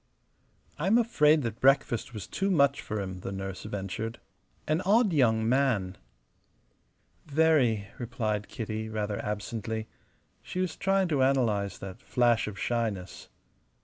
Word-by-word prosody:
"I'm 190 +9 +3
afraid 155 - +4
that 115 -1 -4
breakfast 135 -2 +3
was 105 -4 -6
too 195 +1 -2
much 140 -6 +3
for 110 -1 -4
him," 95 -2 -5
the 95 - -5
nurse 95 -1 -5
ventured. 105 +3 -4 0.5
"An 155 +3 +1
odd 205 +1 +3
young 110 -6 +3
man." 115 -8 +1 1.3
"Very," 140 -9 +3
replied 110 -4 -2
Kitty, 110 -1 -4
rather 105 -1 -3
absently. 110 +2 -4 0.5
She 185 - -6
was 185 -3 -1
trying 195 -1 +1
to 145 -4 +1
analyze 115 -7 +1
that 95 -1 -9
flash 120 -3 +2
of 105 -2 -6
shyness. 110 -6 -3
115 Hz, 130 wpm, -28 LUFS, 105-145 Hz, 1.3 s, afraid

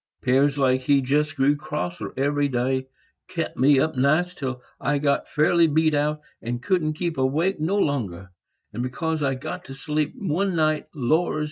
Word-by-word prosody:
'Pears 135 +3 +3
like 130 -2 +2
he 140 +2 +3
just 145 +3 0
grew 140 +1 +3
crosser 90 -11 -4
every 145 +1 +1
day; 130 0 -1 0.4
kep - - -3
me 135 +2 +4
up 160 +2 0
nights 155 +7 +2
till 130 -2 -4 0.2
I 145 +1 0
got 140 0 0
fairly 165 +2 +3
beat 155 +1 +2
out, 150 +1 0 0.2
and 120 +1 -3
couldn't 160 0 0
keep 165 -2 -3
awake 155 +8 +1
no 170 +7 0
longer; 95 - -1 0.4
and 125 +3 -3
'cause 160 +2 -2
I 135 -2 +1
got 130 - -6
to 135 - -9
sleep 150 +2 -2
one 190 -2 -1
night, 155 -1 +1
Lors! 155 +5 +1
145 Hz, 170 wpm, -24 LUFS, 130-155 Hz, 0.4 s, me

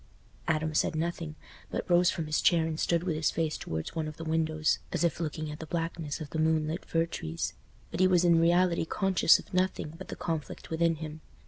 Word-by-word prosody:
Adam 155 0 0
said 155 - +1
nothing, 165 -1 -3 0.3
but - - -3
rose 175 -1 +5
from 165 - -2
his 150 0 0
chair 170 -2 +4
and 160 -1 -3
stood 170 -1 +1
with 175 -4 -1
his 155 0 +1
face 160 -1 -1
towards 80 0 -4
one 160 -2 -2
of 155 - -7
the 165 - -6
windows, 160 -1 +1
as - - 0
if 170 -3 +1
looking 155 -1 -3
at 150 - -8
the 160 - -7
blackness 165 -3 -3
of 155 -3 -7
the 160 - -2
moonlit 160 +1 +1
fir 165 0 +1
trees; 80 - -4 0.4
but 165 - -4
he 185 - +6
was 180 -1 +4
in 170 -1 +5
reality 175 0 +3
conscious 190 0 +4
of - - -12
nothing 185 -4 0
but 190 - -8
the - - -6
conflict 160 -2 -4
within 165 0 +2
him. 155 0 -7
160 Hz, 220 wpm, -29 LUFS, 155-170 Hz, 0.4 s, he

